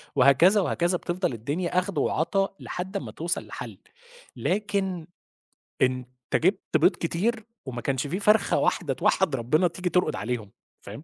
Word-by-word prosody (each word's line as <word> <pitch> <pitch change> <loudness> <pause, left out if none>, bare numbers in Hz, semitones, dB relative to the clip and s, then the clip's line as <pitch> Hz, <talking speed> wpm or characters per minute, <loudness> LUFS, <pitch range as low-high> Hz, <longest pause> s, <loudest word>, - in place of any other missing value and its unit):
وهكذا 140 +10 +6
وهكذا 175 0 +1
بِتفضل 175 -6 -2
الدنيا 155 +11 -1
أخْد 185 -3 -4
وعَطا 195 +7 0
لحد 190 +3 -5
أمّا - - -6
توصل 170 +2 -3
لحَل، - - -8 0.6
لكن 190 -4 -1 0.7
أنت 130 -1 +2 0.3
جِبت 185 -1 +2
بيض 175 +6 +4
كتير 210 +7 -1 0.2
وما 125 -3 -5
كانش 135 +2 -1
في 180 +7 -2
فرخة 210 +2 +3
واحدة - - +1
توحِّد 175 -8 +2
ربِّنا 150 +9 +2
تيجي 180 +1 -3
تُرقُد 180 0 +1
عليهم، 110 +1 -4 0.3
فاهم؟ - - -9
175 Hz, 140 wpm, -26 LUFS, 140-190 Hz, 0.7 s, وهكذا